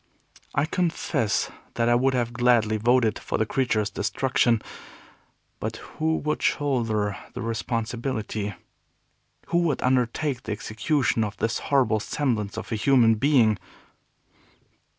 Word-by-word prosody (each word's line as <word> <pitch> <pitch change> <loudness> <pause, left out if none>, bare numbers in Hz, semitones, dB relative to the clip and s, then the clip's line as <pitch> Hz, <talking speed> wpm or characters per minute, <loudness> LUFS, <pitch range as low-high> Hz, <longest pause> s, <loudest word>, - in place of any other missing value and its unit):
I 145 - +3
confess 160 - 0 0.2
that 115 - +1
I 120 - +4
would 130 +2 +2
have 120 -1 -1
gladly 120 -3 +3
voted 115 0 +2
for - - -3
the 110 - +1
creature's 110 -4 0
destruction. 115 +2 +1 1.0
But - - -3
who 160 +1 -2
would 150 +1 -2
shoulder 115 -8 0 0.2
the - - -4
responsibility? 115 -2 -3 0.9
Who 170 - +3
would 170 -4 0
undertake 125 +2 +1
the 110 - -4
execution 115 +3 0
of 105 -1 -4
this 115 0 -1
horrible 130 -6 +3
semblance 110 -4 -2
of - - -6
a - - +1
human 115 0 +4
being? 110 -4 +3
120 Hz, 125 wpm, -25 LUFS, 110-135 Hz, 1.0 s, I